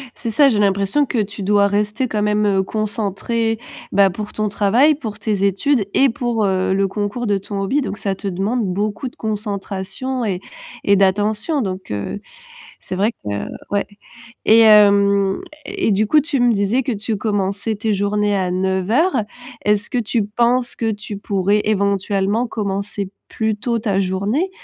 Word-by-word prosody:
C'est 230 - -4
ça, 280 +4 +5
j'ai 210 - +1
l'impression 200 +8 +2
que 245 - -1
tu 205 +1 -8
dois 205 +1 +3
rester 210 +5 0
quand 215 -3 -2
même, 210 0 +1
heu, 195 -2 +2
concentré, 220 +2 -1 0.3
bah, 195 -1 +4
pour 210 +3 -6
ton 215 0 -1
travail, 220 +9 +3
pour 220 -8 -6
tes 210 -2 -1
études 200 +4 +2
et 270 -1 +5
pour, 230 -2 -1
heu, 190 -1 +1
le 195 0 +2
concours 205 +4 -3
de 205 -3 +1
ton 200 +1 -5
hobby. 265 +10 +1
Donc 215 - -4
ça 200 -2 -2
te 195 +1 -6
demande 200 +6 -1
beaucoup 205 +6 -2
de 245 - -10
concentration 210 +4 -4
et 190 -4 -1 0.4
et 200 - +4
d'attention 210 - +1
donc, 185 -2 -4
heu, 105 - -4 0.6
c'est - - -6
vrai 210 +5 +1
que 105 - -11 0.4
ouais 200 0 0 0.6
et 225 +1 +6
hem 200 -2 +5 0.2
et 385 - -1
du 210 +1 +2
coup 305 +7 +5
tu 295 -1 -2
me 245 -1 +4
disais 205 +5 +1
que 250 - -2
tu 215 +1 -3
commençais 205 0 -1
tes 215 +1 -1
journées 205 +1 +1
à 185 -2 0
09:00. 195 - +1 0.4
Est-ce 210 0 +1
que 250 - 0
tu 225 -1 0
penses 240 +3 +1
que 225 -1 0
tu 205 0 -7
pourrais 200 +1 +1
éventuellement 200 +2 +1
commencer 200 -2 -3 0.2
plus 220 -1 -1
tôt 230 +1 -1
ta 200 -3 0
journée? 200 - 0
210 Hz, 175 wpm, -19 LUFS, 200-225 Hz, 0.6 s, et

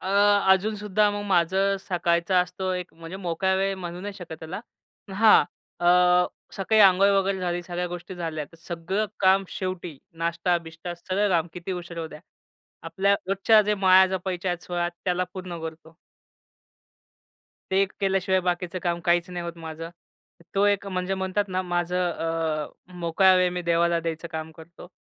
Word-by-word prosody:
अ, - - -8 0.5
अजूनसुद्धा 210 +1 +1
मग 205 0 -4
माझं 190 +2 +2
सकाळचं 170 0 0
असतो 185 +1 -4
एक, 180 0 -5
म्हणजे 165 +2 -9
मोकळा 190 0 0
वेळ 195 +1 0
म्हणू 175 -1 -6
नाही 205 +1 -6
शकत 175 -4 -8
त्याला. 165 +5 -6 0.5
हां, 220 +1 +6 0.4
अ, 175 - 0 0.7
सकाळी 215 +3 +2
अंघोळ 195 0 +6
वगैरे 195 0 +1
झाली, 175 -1 -2
सगळ्या 175 0 -3
गोष्टी 175 +1 -7
झाल्या, 165 -3 -4
तर 165 - -19
सगळं 175 +5 -3
काम 195 0 +4
शेवटी 185 -4 -5 0.3
नाश्ता-बिष्टा 170 0 -2
,सगळं 190 +4 -1
काम 170 -2 +2
किती 180 +2 -5
उशीर 175 -1 -7
होऊ 165 -1 -4
द्या, 150 -1 -11 0.6
आपल्या 195 +4 +1
रोजच्या 195 +3 +4
जे 210 0 +1
माळा 190 -1 +6
जपायच्या 185 0 -3
आहेत 175 0 -4
16, 175 -1 -2 0.2
त्याला 180 -1 +1
पूर्ण 180 -2 -6
करतो. 160 0 -9 1.7
ते 190 +1 +3
एक 195 - -2
केल्याशिवाय 190 -1 +1
बाकीचं 180 0 -2
काम 175 -1 -1
काहीच 175 +1 +2
नाही 175 -1 -5
होत 170 0 -6
माझं. 165 0 -7 0.6
तो 200 +1 +3
एक 200 -1 +1
म्हणजे 185 0 -2
म्हणतात 190 +2 -1
ना 185 0 -1
माझं 175 0 -1
अ, 160 -2 -2 0.3
मोकळा 175 +3 +4
वेळ 180 -1 +3
मी 180 0 -3
देवाला 170 0 +2
द्यायचं 165 0 -4
काम 160 0 -5
करतो. 170 +2 -13
180 Hz, 160 wpm, -25 LUFS, 170-190 Hz, 1.7 s, हां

